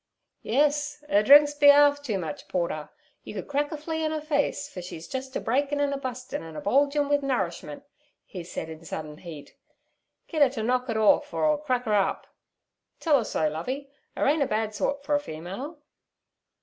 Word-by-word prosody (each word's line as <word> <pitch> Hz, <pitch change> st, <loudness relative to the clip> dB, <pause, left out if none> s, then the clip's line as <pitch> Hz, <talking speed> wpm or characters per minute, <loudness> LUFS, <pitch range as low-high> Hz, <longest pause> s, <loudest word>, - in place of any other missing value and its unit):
'Yes, 295 Hz, +3 st, 0 dB
'er 205 Hz, -, +5 dB
drinks 290 Hz, +5 st, +7 dB
be 290 Hz, 0 st, +6 dB
'arf 285 Hz, 0 st, +6 dB
too 230 Hz, -8 st, -2 dB
much 160 Hz, -5 st, -6 dB
porter. 170 Hz, -4 st, -2 dB, 0.3 s
You -, -, -9 dB
could 190 Hz, -, -5 dB
crack 290 Hz, +1 st, -1 dB
a 310 Hz, -, -4 dB
flea 320 Hz, +1 st, -3 dB
on 310 Hz, -, 0 dB
'er 310 Hz, -, -2 dB
face, 285 Hz, -1 st, -1 dB
fer 190 Hz, -10 st, -8 dB
she's 170 Hz, -2 st, -8 dB
jus' 260 Hz, +3 st, -6 dB
a -, -, 0 dB
breakin', 280 Hz, +4 st, 0 dB
an' 285 Hz, -1 st, +1 dB
a -, -, -2 dB
bustin', 255 Hz, -1 st, -5 dB
an' 160 Hz, -1 st, -10 dB
a -, -, -4 dB
bulgin'wi 285 Hz, +5 st, +2 dB
nourishment' 190 Hz, -, -3 dB, 0.4 s
he 180 Hz, -3 st, -8 dB
said 165 Hz, -, -6 dB
in 160 Hz, 0 st, -10 dB
sudden 155 Hz, -1 st, -7 dB
heat. 160 Hz, -5 st, -10 dB, 0.7 s
'Git 315 Hz, -3 st, -2 dB
'er 285 Hz, -, +7 dB
ter 240 Hz, -4 st, -4 dB
knock 250 Hz, +2 st, 0 dB
it 225 Hz, -, 0 dB
orf 220 Hz, +7 st, +3 dB
or -, -, -1 dB
'er'll 305 Hz, -1 st, +3 dB
crack 255 Hz, -4 st, -1 dB
up. 205 Hz, -3 st, +1 dB, 0.7 s
Tell 300 Hz, -4 st, +3 dB
'er -, -, -1 dB
so, 160 Hz, -6 st, 0 dB
Lovey. 260 Hz, -, -4 dB, 0.3 s
'Er -, -, +1 dB
ain't 295 Hz, +2 st, +3 dB
a 280 Hz, -, +2 dB
bad 215 Hz, 0 st, -1 dB
sort 280 Hz, +7 st, -2 dB
for 295 Hz, -, -1 dB
a 290 Hz, -, +4 dB
female.' 200 Hz, -, -7 dB
265 Hz, 200 wpm, -26 LUFS, 195-290 Hz, 0.7 s, drinks